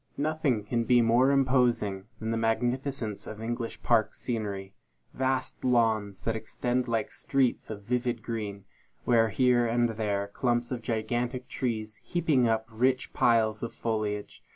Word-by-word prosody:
Nothing 150 -7 0
can 115 +3 0
be 125 0 +5
more 120 +3 +4
imposing 125 -8 +2
than 110 0 -3
the - - 0
magnificence 120 0 -1
of 110 - -7
English 115 +1 -4
park 115 -3 +2
scenery. 100 -5 -4 0.4
Vast 130 0 -1
lawns 110 -5 +1
that 115 - 0
extend 120 +3 -2
like 115 -2 -1
sheets 135 -3 0
of 105 -2 -6
vivid 120 0 -1
green, 105 -4 -4 0.4
with 115 -3 +3
here 125 -2 +3
and 120 +1 +2
there 105 -3 -2
clumps 120 -1 0
of 125 -2 -3
gigantic 120 +3 -2
trees, 110 -4 -3
heaping 155 -8 +2
up 110 0 +1
rich 130 +3 +1
piles 110 -2 +3
of 115 - -5
foliage. 105 -2 -3
115 Hz, 145 wpm, -28 LUFS, 110-125 Hz, 0.4 s, be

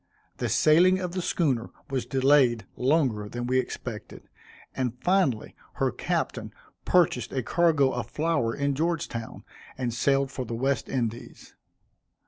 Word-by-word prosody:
The - - -2
sailing 175 +4 +5
of 180 -2 -3
the 185 +1 -3
schooner 135 -10 0 0.2
was 130 -2 -2
delayed 130 -5 +3
longer 125 -7 +1
than 120 +2 -4
we 130 +1 +2
expected; 120 -3 -6 0.5
and, 125 -2 -2
finally, 180 - +1 0.2
her - - 0
captain - - -3 0.3
purchased 130 -10 +2
a 130 -2 -2
cargo 155 -3 +3
of 120 - -4
flour 150 -8 0
in 140 0 0
Georgetown, 150 -7 -3 0.3
and 125 -3 -2
sailed 135 +2 +1
for 130 - -4
the 115 -1 -5
West 130 0 -1
Indies. 120 -3 -4
130 Hz, 135 wpm, -26 LUFS, 120-155 Hz, 0.5 s, sailing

